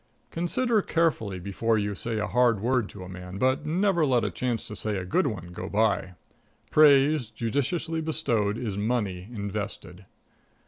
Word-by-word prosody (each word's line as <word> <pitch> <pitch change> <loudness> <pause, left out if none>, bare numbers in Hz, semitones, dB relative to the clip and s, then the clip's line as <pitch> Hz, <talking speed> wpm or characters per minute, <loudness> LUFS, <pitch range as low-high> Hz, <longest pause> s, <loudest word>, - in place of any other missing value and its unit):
Consider 215 +7 +1
carefully 155 - 0
before 100 +5 0
you 105 -1 -1
say 115 +3 -4
a 105 - 0
hard 120 -1 +3
word 120 0 +1
to 95 - -9
a - - -9
man, 90 +1 -8
but 130 +5 +1
never 175 +1 +2
let 125 -5 +3
a - - -1
chance 120 -3 -2
to 105 - -7
say 105 -1 -2
a 90 - -4
good 180 - +1
one 95 -8 -5
go 90 +2 -6
by. 100 -4 +1 0.6
Praise 145 -3 +5
judiciously 150 +9 -2
bestowed 120 -10 0
is 105 -5 -3
money 105 -4 -1
invested. 100 -3 -6
115 Hz, 165 wpm, -27 LUFS, 100-140 Hz, 0.6 s, Praise